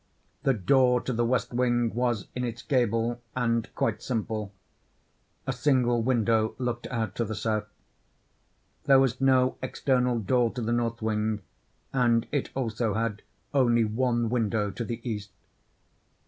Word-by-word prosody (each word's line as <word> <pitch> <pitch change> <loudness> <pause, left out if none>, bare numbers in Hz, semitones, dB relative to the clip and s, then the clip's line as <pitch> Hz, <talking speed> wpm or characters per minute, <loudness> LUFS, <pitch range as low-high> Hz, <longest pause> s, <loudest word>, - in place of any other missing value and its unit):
The 135 - +2
door 125 +4 +4
to 130 - -3
the 120 +1 +1
west 125 +1 0
wing 120 -2 +1
was 120 -4 0
in 125 - -2
its 120 -1 -4
gable, 120 -2 +1
and 115 -2 0
quite - - 0
simple—a 110 +2 -7
single 125 -2 +2
window 115 -2 +2
looked 120 -1 -3
out 110 -5 -2
to 115 - +1
the 110 -1 -4
south. 105 0 -1 1.2
There 135 -1 +6
was 135 -1 +1
no 130 -1 +3
external 125 -1 +1
door 120 +3 +2
to 125 - -4
the 115 +2 0
north 115 -1 -1
wing, 105 -1 -1 0.5
and 120 -3 +3
it 145 - -1
also 115 -4 -1
had 110 -2 -1 0.3
only 120 -4 +4
one 120 +1 0
window 110 -4 0
to 115 - -4
the 115 +2 -5
east. 105 -3 -4
120 Hz, 145 wpm, -27 LUFS, 110-125 Hz, 1.2 s, There